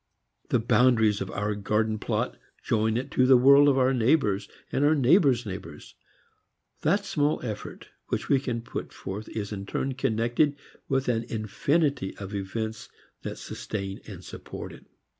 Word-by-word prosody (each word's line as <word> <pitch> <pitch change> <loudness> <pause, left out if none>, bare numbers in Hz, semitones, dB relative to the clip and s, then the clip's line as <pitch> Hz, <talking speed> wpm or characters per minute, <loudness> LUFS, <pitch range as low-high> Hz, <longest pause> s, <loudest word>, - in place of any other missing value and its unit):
The - - +3
boundaries 115 -2 +3
of 95 - -3
our 105 +1 -2
garden 105 +1 0
plot - - -1 0.3
join 110 0 +1
it 125 - -4
to 130 - +3
the 130 -1 +8
world 140 +3 +7
of 135 - +3
our 130 0 +3
neighbors 110 -5 +2 0.2
and 140 - +1
our 150 +2 +5
neighbors' 135 - +4
neighbors. 95 -3 -8 0.9
That 200 +6 +2
small 150 -6 +1
effort 110 -3 -7 0.2
which - - -2
we 140 - +4
can 120 -3 -3
put - - -6
forth 100 +3 -6
is 105 -2 -4
in 100 -1 -5
turn 135 +5 -2
connected 125 +3 +1 0.3
with 135 0 +1
an 115 -2 0
infinity 120 - 0
of 100 0 -7
events 110 +3 -4 0.3
that - - -5
sustain 100 -1 -5
and 95 -4 -9
support - - -8
it. - - -15
115 Hz, 160 wpm, -27 LUFS, 105-135 Hz, 0.9 s, the